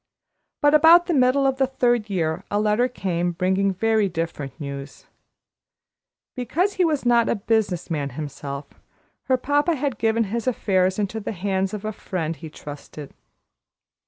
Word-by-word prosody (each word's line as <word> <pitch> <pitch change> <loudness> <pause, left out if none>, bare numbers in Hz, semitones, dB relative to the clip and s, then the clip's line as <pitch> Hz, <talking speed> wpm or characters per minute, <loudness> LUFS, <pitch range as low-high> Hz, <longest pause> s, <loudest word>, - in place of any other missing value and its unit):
But 290 0 +5
about 325 +3 +7
the 350 - -1
middle 265 0 +3
of 270 -1 +1
the 265 -1 +2
third 240 -4 +1
year 170 -2 -1
a 205 - 0
letter 215 +4 +2
came 175 -7 -2
bringing 190 +3 +1
very 215 +1 +1
different 165 -4 -5
news. 140 -1 -7 1.3
Because 340 - 0
he 375 - +1
was 305 -6 0
not 235 -1 +4
a - - +2
business 205 -5 -1
man 145 -3 -1
himself, 140 -1 -6 0.6
her 260 -1 +2
papa 290 +6 +1
had 270 -5 -2
given 225 +1 +2
his 225 +3 -3
affairs 190 -6 +1
into 210 +1 -2
the 215 - -4
hands 190 0 -1
of 210 0 -6
a 215 - -1
friend 165 -5 -4
he 160 - -9
trusted. 145 -1 -10
210 Hz, 160 wpm, -23 LUFS, 175-250 Hz, 1.3 s, about